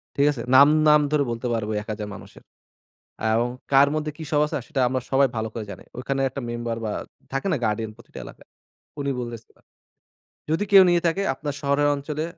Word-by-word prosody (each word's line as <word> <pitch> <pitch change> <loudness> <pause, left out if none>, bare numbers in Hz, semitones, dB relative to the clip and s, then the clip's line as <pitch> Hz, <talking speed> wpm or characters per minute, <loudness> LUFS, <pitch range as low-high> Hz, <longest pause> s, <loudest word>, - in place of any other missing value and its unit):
ঠিক 140 - +3
আছে? 125 - -5
নাম, 140 +2 +9 0.2
নাম 150 0 +6
ধরে 150 -2 +3
বলতে 115 +2 -3
পারবো 110 -2 -2
ওই - - -1
1000 105 -1 -5
মানুষের। - - -14 0.8
অ্যাও 110 +1 +2 0.3
কার 140 +1 +6
মধ্যে 155 0 -2
কি 160 - -7
সব 150 - +3
আছে? 150 - -4
সেটা 140 -5 -1
আমরা 130 +1 -1
সবাই 135 0 +4
ভালো 110 0 -1
করে 110 -2 -5
জানি। 95 - -10
ওইখানে 135 +2 -2
একটা 140 - -6
মেম্বার 120 -1 -3
বা 105 - -2 0.4
থাকে 135 +8 -1
না? 160 - +1
গার্ডিয়ান 110 0 -1
প্রতিটি 120 - -15
এলাকায়। - - -14 0.5
উনি 140 0 -1
বলেসিলো, 120 -2 -9 0.9
যদি 165 +6 +1
কেউ 195 -1 +9
নিয়ে 175 -1 +3
থাকে 170 +4 0
আপনার 145 -2 -5
শহরের 140 0 +2
অঞ্চলে 150 +2 -4
135 Hz, 195 wpm, -24 LUFS, 115-150 Hz, 0.9 s, নাম